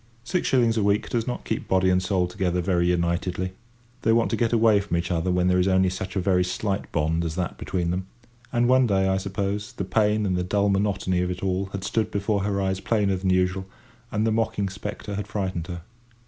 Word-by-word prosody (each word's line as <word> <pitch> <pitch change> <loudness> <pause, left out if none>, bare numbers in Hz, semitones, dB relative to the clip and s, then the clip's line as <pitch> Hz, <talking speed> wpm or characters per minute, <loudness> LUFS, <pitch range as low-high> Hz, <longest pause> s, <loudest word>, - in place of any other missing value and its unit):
Six 180 +8 -1
shillings 120 -3 +3
a 110 - +2
week 100 +1 +1
does 115 -1 -1
not 125 - -4
keep - - -3
body 95 0 +3
and 90 0 +3
soul 90 -1 +1
together 90 0 -1
very 85 -1 +1
unitedly. 90 +1 0 0.5
They 115 - +2
want 115 0 +3
to - - +2
get 115 -2 +1
away 110 -3 +4
from 100 -4 -2
each 85 +1 -2
other 85 +1 0
when 90 0 +2
there 90 0 +3
is 90 - +2
only 95 -1 +3
such 95 0 -5
a - - +1
very 90 0 +2
slight 95 +2 -2
bond 80 +1 0
as 80 -1 -3
that 90 -1 -3
between 85 -2 -1
them; 90 +1 -3 0.4
and 120 -1 +2
one 130 0 +5
day, 95 -2 +2
I 95 0 +2
suppose, 100 +1 -3
the 95 - -4
pain 105 +1 +2
and 95 -2 0
the 90 - 0
dull 100 +2 +1
monotony 100 -2 +1
of 90 - -1
it 90 +1 -5
all 95 0 0
had 95 0 -6
stood 110 +2 0
before 100 0 0
her 100 0 -1
eyes 95 -1 0
plainer 100 -2 +1
than 95 +1 -1
usual, 90 +1 +1 0.4
and 110 0 0
the 110 - +2
mocking 110 -3 0
spectre 105 +1 -6
had 105 0 -4
frightened 95 -5 -3
her. 85 -2 -6
95 Hz, 230 wpm, -25 LUFS, 90-105 Hz, 0.5 s, one